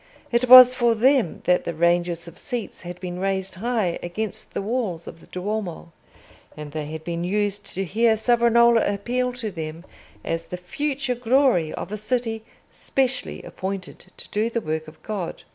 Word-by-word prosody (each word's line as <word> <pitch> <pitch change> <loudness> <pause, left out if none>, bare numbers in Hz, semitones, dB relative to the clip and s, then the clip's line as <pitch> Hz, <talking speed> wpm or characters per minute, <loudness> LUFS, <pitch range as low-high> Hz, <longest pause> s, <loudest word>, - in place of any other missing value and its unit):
It 240 +1 +1
was 255 0 +11
for 240 -2 +2
them 250 - +2
that 180 0 +3
the 170 - -4
ranges 170 0 +1
of 170 +1 -12
seats 240 -5 -5
had 175 0 -8
been 180 -1 -5
raised 190 0 -1
high 215 -3 -1
against 210 +4 -5
the - - -1
walls 210 -7 -2
of 165 - -10
the - - -18
Duomo; 185 -3 -4 0.7
and 150 -1 -7
they 150 -1 -4
had 160 +1 -7
been 170 0 -3
used 205 +2 -1
to 195 - -1
hear 220 +4 +2
Savonarola 235 0 +4
appeal 245 +5 -1
to 235 -4 -4
them 165 0 -6 0.4
as 165 0 -3
the 180 - -6
future 270 +8 -2
glory 245 - +2
of - - -6
a 210 - -3
city 225 0 -2 0.3
specially 265 -1 -2
appointed 190 -1 -6
to - - -8
do 215 +2 0
the 235 - -1
work 155 -5 -3
of 155 0 -15
God. 200 -6 -5
205 Hz, 175 wpm, -23 LUFS, 175-235 Hz, 0.7 s, was